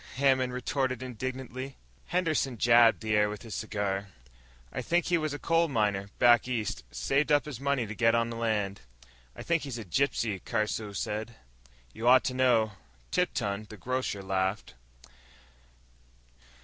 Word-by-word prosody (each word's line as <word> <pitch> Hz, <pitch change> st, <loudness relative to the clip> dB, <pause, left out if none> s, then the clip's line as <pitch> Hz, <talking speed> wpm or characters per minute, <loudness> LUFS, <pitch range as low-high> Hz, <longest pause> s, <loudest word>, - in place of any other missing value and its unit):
Hammond 130 Hz, -1 st, +3 dB
retorted 130 Hz, 0 st, -2 dB
indignantly. 130 Hz, +2 st, -5 dB, 0.3 s
Henderson 155 Hz, -8 st, 0 dB
jabbed 115 Hz, 0 st, +5 dB
the 110 Hz, -1 st, -1 dB
air 105 Hz, 0 st, +3 dB
with 105 Hz, +2 st, -7 dB
his 115 Hz, -, -8 dB
cigar. 100 Hz, -2 st, -2 dB, 0.7 s
"I -, -, -2 dB
think 175 Hz, 0 st, +1 dB
he 175 Hz, -, +2 dB
was 155 Hz, -1 st, -2 dB
a 145 Hz, -, -3 dB
coal 165 Hz, +2 st, +2 dB
miner, 105 Hz, -7 st, 0 dB
back 120 Hz, 0 st, +5 dB
East. 115 Hz, -, -2 dB
Saved 135 Hz, -, 0 dB
up 145 Hz, -1 st, +4 dB
his 145 Hz, -6 st, -7 dB
money 140 Hz, -3 st, 0 dB
to 105 Hz, -, -6 dB
get 115 Hz, +1 st, +3 dB
on 115 Hz, 0 st, +1 dB
the -, -, -5 dB
land." 105 Hz, -4 st, -1 dB, 0.5 s
"I -, -, -8 dB
think 170 Hz, -1 st, +1 dB
he's 135 Hz, -4 st, -5 dB
a 115 Hz, -, -7 dB
gypsy," 110 Hz, -1 st, 0 dB
Caruso 110 Hz, -2 st, -2 dB
said. 110 Hz, +3 st, -4 dB, 0.6 s
"You 115 Hz, -, -3 dB
ought 130 Hz, +1 st, +7 dB
to 130 Hz, -, -1 dB
know," 120 Hz, -4 st, +3 dB, 0.4 s
Tipton, 105 Hz, -, -1 dB
the 110 Hz, -, -10 dB
grocer, 125 Hz, -5 st, -2 dB
laughed. 95 Hz, -1 st, -1 dB
120 Hz, 155 wpm, -29 LUFS, 105-135 Hz, 0.7 s, ought